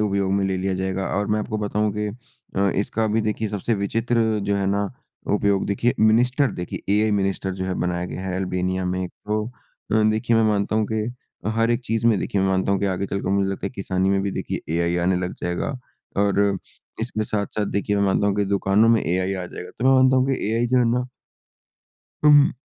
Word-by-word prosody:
उपयोग 100 -2 0
में 100 -1 +1
ले 95 -1 0
लिया 95 0 -1
जाएगा 95 0 -2
और 105 0 0
मैं 105 - +2
आपको 110 0 -3
बताऊँ 105 0 0
कि 105 0 -1 0.5
अ, 100 0 +3
इसका 110 +2 -1
अभी 110 +1 +1
देखिए 110 0 -1
सबसे 105 +3 -1
विचित्र 110 +2 0
जो 100 0 0
है 100 - 0
ना, 100 0 0 0.4
उपयोग 100 -1 +2
देखिए 115 +4 +1
मिनिस्टर 125 +5 +4
देखिए 90 -1 -6
एआई 110 0 +2
मिनिस्टर 100 -1 0
जो 95 0 -4
है 95 -1 -2
बनाया 90 0 -1
गया 95 - -6
है 90 - -2
अल्बानिया 95 0 -1
में। 90 0 -1
तो 105 +3 -3 0.7
देखिए 115 +1 +1
मैं 115 - +4
मानता 105 0 +1
हूँ 110 -1 +1
कि 110 -1 0 0.5
हर 115 +1 +2
एक 120 +1 +1
चीज़ 115 0 0
में 110 -4 +4
देखिए 100 - -1
मैं 95 - +2
मानता 95 +1 +1
हूँ 100 - +1
कि 100 - +1
आगे 95 +1 -1
चलकर 100 0 -3
मुझे 100 0 +1
लगता 95 - -3
है, - - -4
किसानी 95 -4 -1
में 100 0 +2
भी 100 - -1
देखिए - - -4
एआई 85 +1 +1
आने 90 +1 +2
लग - - -6
जाएगा 90 +10 -2 0.4
और, 100 -1 +2 0.4
इसके 110 -2 -2
साथ-साथ 105 0 -2
देखिए 100 +1 -1
मैं 100 - +2
मानता 100 +1 +2
हूँ 100 - +2
कि 100 - +2
दुकानों 100 +2 +3
में 115 -1 +5
एआई 95 +2 0
आ 90 -1 -4
जाएगा। 90 - -8
तो 125 - -2
मैं 135 - +6
मानता 130 0 +5
हूँ 130 0 +3
कि 135 - +1 0.2
एआई 115 +1 +1
जो 125 +1 +3
है 125 - +4
ना 125 +1 +1 1.2
अम, 145 -1 +7
100 Hz, 220 wpm, -23 LUFS, 95-110 Hz, 1.2 s, अम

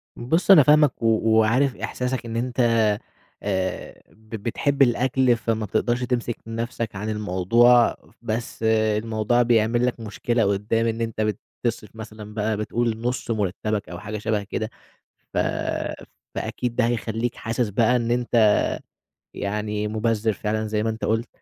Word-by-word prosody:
بُصّ 160 +11 +2
أنا 165 -7 +9
فاهمك 150 -1 +4
و 115 - -1 0.2
وعارف 115 +5 +3
إحساسك 125 -1 -3
إن 115 0 -5
أنت 125 +1 -3 0.8
آآ، 95 -2 -3
ب 110 0 -24
بتحب 135 +6 -1
الأكْل 125 0 +3
فما 115 -1 -1
بتقدرش 120 +4 0
تمسك 120 -2 -1
نَفسك 115 -1 -4
عن 105 +3 -4
الموضوع، 110 +4 +4 0.3
بس 115 0 -4
الموضوع 110 +1 +2
بيعمل 120 0 +3
لك 125 -1 -1
مشكلة 115 +2 -1
قدّام 105 +3 +1
إن 115 0 -2
أنت 115 -1 -2 0.4
بتصرف 110 -2 -3
مثلًا 110 -1 -9
بقى 105 0 -1
بتقول 115 +1 -1
نُص 125 0 -2
مرتبك 105 0 -2
أو 85 0 -7
حاجة 105 +1 -5
شبه 105 -1 -1
كده، 110 +2 -4 0.7
ف - - 0 1.0
فأكيد 120 -1 -3
ده 125 - +3
هيخلّيك 115 0 -2
حاسس 115 +1 -2
بقى 115 +4 +3
إن 120 -1 -1
أنت 120 -3 +3 0.8
يعني 105 +1 -2
مُبذّر 110 0 0
فعلًا 110 +1 -2
زي 105 0 -1
ما 110 - 0
أنت 110 0 -5
قُلت، 115 +2 0
115 Hz, 145 wpm, -23 LUFS, 105-120 Hz, 1.0 s, أنا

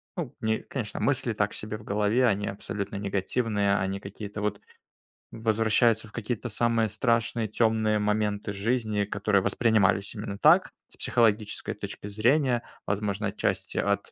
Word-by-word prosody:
ну, 160 -9 -4
не 110 0 0
конечно, 115 -6 -5
мысли 135 -4 +1
так 105 -1 0
себе 105 0 -5
в 105 - -14
голове, 105 +5 +2
они 105 -3 +1
абсолютно 100 0 -5
негативные, 100 +1 0
они 95 0 -1
какие-то 105 +1 -7
вот 105 -1 -2 0.7
возвращаются 110 0 +2
в - - -17
какие-то 115 +1 -3
самые 115 0 +2
страшные, 115 0 0
темные 110 -1 +2
моменты 105 -1 0
жизни, 110 0 0
которые 100 -1 +1
воспринимались 100 0 +2
именно 105 -1 -5
так, - - +5 0.2
с - - -10
психологической 110 -3 +1
точки 100 - -7
зрения. 120 +4 +2 0.2
Возможно, 105 +1 -1
отчасти, - - -2
от 100 0 0
105 Hz, 140 wpm, -27 LUFS, 100-115 Hz, 0.7 s, так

